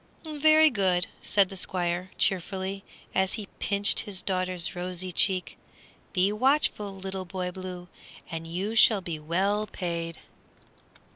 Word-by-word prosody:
"Very 310 0 +5
good," 185 -5 +2 0.2
said 200 -2 +3
the 195 - -8
Squire, 180 0 -2
cheerfully, 190 +1 -1 0.3
as 190 0 +1
he 215 - -3
pinched 200 0 +2
his 195 -4 -3
daughter's 185 -2 -1
rosy 180 +1 -2
cheek; 185 +1 0 0.5
"be 190 +2 +2
watchful, 220 -5 +2
Little 190 0 -5
Boy 180 0 -4
Blue, 180 -1 -7 0.4
and 165 0 -5
you 190 +7 -3
shall 220 -2 +7
be 170 -3 -5
well 195 +7 0
paid." 170 -3 -4
190 Hz, 130 wpm, -27 LUFS, 180-200 Hz, 0.5 s, shall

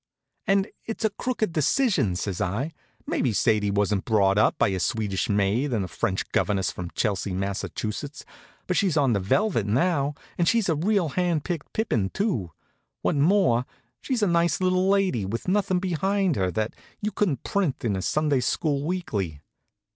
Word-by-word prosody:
"And 195 0 +3 0.2
it's 225 0 -3
a 215 - +2
crooked 220 -4 -2
decision," 165 - +2
says 95 0 -3
I. 105 - -1 0.3
"Maybe 125 -5 0
Sadie 105 -1 +2
wasn't 100 -1 +1
brought 100 -3 +3
up - - +3
by - - +3
a 95 -1 -1
Swedish 100 0 -1
maid 105 +7 +1
and 105 -5 0
a - - -6
French 95 +1 -2
governess 100 -3 +1
from 90 -2 -6
Chelsea, 100 -3 -1
Mass.; 100 +1 -2 1.0
but 180 - -1
she's 180 -5 +2
on 135 -5 +3
velvet 105 - +1
now, 140 - +1 0.2
and 170 - +2
she's 230 0 +3
a 160 - +3
real 180 +1 +1
hand 175 -2 0
picked 170 -4 -4
pippin, 115 - 0
too. 135 - -1 0.5
What's 145 - +1
more, 150 - +3 0.4
she's 250 -5 -1
a - - +4
nice 170 -2 +2
little 185 0 +2
lady, 195 - +2
with 110 - -4
nothin' 190 -1 +2
behind 190 0 0
her 95 -4 +1
that 110 +3 -2 0.3
you 210 +1 -2
couldn't 170 - 0
print 180 -12 -1
in 105 -4 +1
a 95 - -2
Sunday 150 +6 +1
school 140 +3 0
weekly. 105 - -2
140 Hz, 170 wpm, -25 LUFS, -, 1.0 s, a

